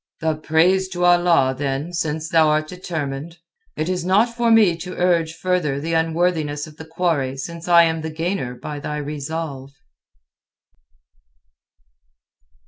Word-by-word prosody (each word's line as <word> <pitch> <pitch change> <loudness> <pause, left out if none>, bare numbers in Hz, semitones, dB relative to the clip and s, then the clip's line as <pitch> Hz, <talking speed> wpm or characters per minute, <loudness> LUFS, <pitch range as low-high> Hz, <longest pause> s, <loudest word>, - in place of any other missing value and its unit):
"The 160 -1 0
praise 170 +5 +2
to 175 0 0
Allah, 175 -7 +4
then, 140 +4 -3
since 160 -2 -2
thou'rt 155 -2 +3
determined. 160 -3 -5 0.4
It 155 - -1
is 180 -1 -1
not 210 +6 +2
for 235 -1 +1
me 215 -6 +5
to 180 +2 -7
urge 170 -3 +1
further 165 -6 -1
the 165 +3 -3
unworthiness 160 -2 0
of 155 -1 -14
the 160 - -9
quarry 160 -5 -1
since 170 +5 -7
I 170 -1 +7
am 160 -1 0
the 160 - -4
gainer 160 -5 -3
by 145 +4 -7
thy 150 +1 -4
resolve." 145 -1 -5
160 Hz, 135 wpm, -21 LUFS, 150-175 Hz, 0.4 s, I